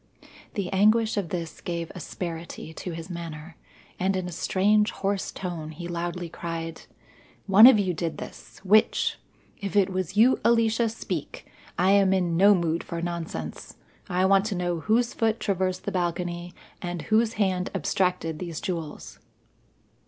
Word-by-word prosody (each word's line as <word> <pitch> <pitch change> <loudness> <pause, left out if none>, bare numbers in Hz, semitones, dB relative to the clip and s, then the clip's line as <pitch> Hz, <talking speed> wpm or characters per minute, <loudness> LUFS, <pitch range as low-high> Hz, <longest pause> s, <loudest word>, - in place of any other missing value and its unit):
The 195 -2 -2
anguish 215 +3 +4
of 200 -5 -2
this 170 -3 -5
gave 170 -1 -4
asperity 165 -1 -6
to 180 - -6
his 165 0 -7
manner, 165 -2 -7 0.4
and 190 +1 +1
in 185 -1 -2
a - - -6
strange, 210 +5 +2
hoarse 195 0 -2
tone 175 -4 -5
he 170 +2 -7
loudly 175 0 -3
cried: 165 -1 -5 0.6
"One 205 +4 +9
of 260 - +8
you 190 -3 +1
did 165 -2 -3
this. - - -10
Which? 215 +4 +3 0.4
If 200 0 -5
it 195 -2 +4
was 185 +1 -3
you, 240 +4 +5
Alicia, 230 0 +3
speak. 480 - -5 0.3
I 185 +2 +4
am 195 -1 +5
in 180 -3 +1
no 200 +4 +6
mood 170 -2 -1
for 170 - -5
nonsense. 165 - -5 0.3
I 180 +1 +2
want 195 +1 +4
to 210 -2 -2
know 175 -1 -1
whose 230 +7 +1
foot 225 0 0
traversed 185 -2 -1
the 200 - -3
balcony 175 -1 -2 0.3
and 175 -2 -4
whose 225 +1 +2
hand 190 -4 0
abstracted 180 -2 0
these 170 -4 -5
jewels." 170 -6 -5
180 Hz, 155 wpm, -26 LUFS, 170-200 Hz, 0.6 s, One